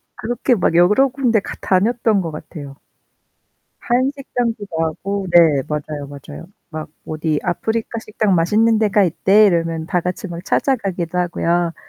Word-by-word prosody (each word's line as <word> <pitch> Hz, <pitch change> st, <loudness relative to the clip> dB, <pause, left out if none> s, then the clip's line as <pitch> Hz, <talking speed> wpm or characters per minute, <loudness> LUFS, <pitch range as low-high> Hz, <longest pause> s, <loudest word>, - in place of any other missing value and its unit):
그렇게 240 Hz, +2 st, 0 dB
막 175 Hz, -3 st, 0 dB
여러 210 Hz, +10 st, +5 dB
군데 245 Hz, -4 st, +1 dB
갔 -, -, -8 dB
다녔던 215 Hz, +1 st, +2 dB
것 165 Hz, -2 st, -4 dB
같아요. 145 Hz, -2 st, -9 dB, 1.1 s
한식당도 245 Hz, -4 st, -1 dB
가고 180 Hz, +4 st, -3 dB
네, 160 Hz, -6 st, +5 dB
맞아요, 150 Hz, -1 st, -4 dB
맞아요. 140 Hz, +4 st, -10 dB, 0.2 s
막 155 Hz, -1 st, -6 dB, 0.2 s
"어디 155 Hz, -1 st, -1 dB
아프리카 220 Hz, +6 st, -2 dB
식당 215 Hz, -2 st, 0 dB
맛있는 215 Hz, +6 st, +3 dB
데가 210 Hz, -2 st, +3 dB
있대." 195 Hz, +4 st, +4 dB
이러면 165 Hz, -3 st, 0 dB
다 180 Hz, 0 st, 0 dB
같이 180 Hz, +4 st, -4 dB
막 170 Hz, +1 st, -7 dB
찾아가기도 190 Hz, -, -1 dB
하고요. 175 Hz, -1 st, 0 dB
185 Hz, 305 characters per minute, -19 LUFS, 165-220 Hz, 1.1 s, 여러